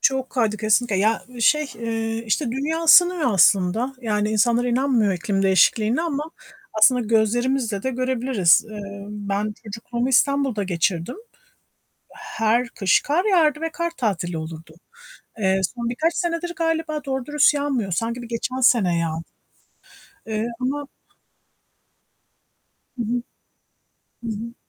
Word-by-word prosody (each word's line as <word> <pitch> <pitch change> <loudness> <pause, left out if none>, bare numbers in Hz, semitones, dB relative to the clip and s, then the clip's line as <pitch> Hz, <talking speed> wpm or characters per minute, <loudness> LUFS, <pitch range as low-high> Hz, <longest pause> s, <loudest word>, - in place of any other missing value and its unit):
Çok 265 -1 +1
kaydı 220 -4 0
kesinlikle. 215 0 +1
Ya, 215 +3 +1 0.2
şey, 300 +5 +3
eee, 225 0 -3
işte, 250 +6 0
dünya 310 +5 -2
ısınıyor 350 -5 +5
aslında. 195 +8 +3
Yani, 210 -2 -1
insanlar 235 +3 +2
inanmıyor 245 -4 +1
iklim 195 +2 -2
değişikliğine 215 - +3
ama 300 -3 -2 0.5
aslında 250 +4 +5
gözlerimizle 230 0 0
de 260 - -1
görebiliriz. 250 -8 +2
Eee, 200 -1 -8
ben 205 0 -3
çocukluğumu 235 +3 -4
İstanbul'da 270 -4 +2
geçirdim. 175 - -1 1.0
Her 225 +2 -1
kış 195 -4 +2
kar 325 +7 0
yağardı 310 -4 +3
ve 325 - -2
kar 340 0 -3
tatili 180 -7 -2
olurdu. 160 0 -8 0.6
Eee, 190 -1 +1
son 235 -1 -3
birkaç 315 +8 0
senedir 345 0 -2
galiba 320 -2 -2
doğru 265 -3 -3
dürüst 295 0 +3
yağmıyor. 270 -9 -2
Sanki 230 +6 -2
bir 235 - -9
geçen 235 +2 -3
sene 205 -9 +3
yağ 165 -1 -1 1.2
eee, 220 0 -2
ama 285 +3 -2 2.1
Hı - - -1
hı. 240 +2 -2 1.0
Hı - - -4
hı. 230 +2 -6
235 Hz, 125 wpm, -22 LUFS, 210-270 Hz, 2.1 s, ısınıyor